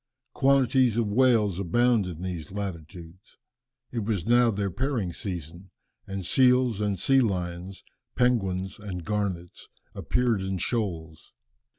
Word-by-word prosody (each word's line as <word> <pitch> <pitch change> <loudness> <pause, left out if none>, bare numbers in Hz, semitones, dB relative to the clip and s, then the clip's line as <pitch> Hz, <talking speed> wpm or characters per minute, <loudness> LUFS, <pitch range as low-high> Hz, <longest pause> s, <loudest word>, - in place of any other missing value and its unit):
Quantities 130 -3 +3
of 115 -3 +1
whales 110 -6 +3
abound 115 +2 +2
in 90 -1 -7
these 90 -4 -5
latitudes. 90 -2 -8 0.5
It 120 - -2
was 100 -5 -2
now 120 +1 +4
their 100 -2 -1
pairing 115 - -2
season, 85 0 -7 0.4
and 95 -2 -5
seals 125 0 +3
and 100 -2 0
sea 135 +8 +4
lions, 90 -3 -3 0.3
penguins 95 -6 0
and 95 -5 -6
garnets 95 -4 -3 0.3
appeared 120 -5 0
in 95 0 -2
shoals. 85 -6 -4
100 Hz, 120 wpm, -26 LUFS, 90-120 Hz, 0.5 s, now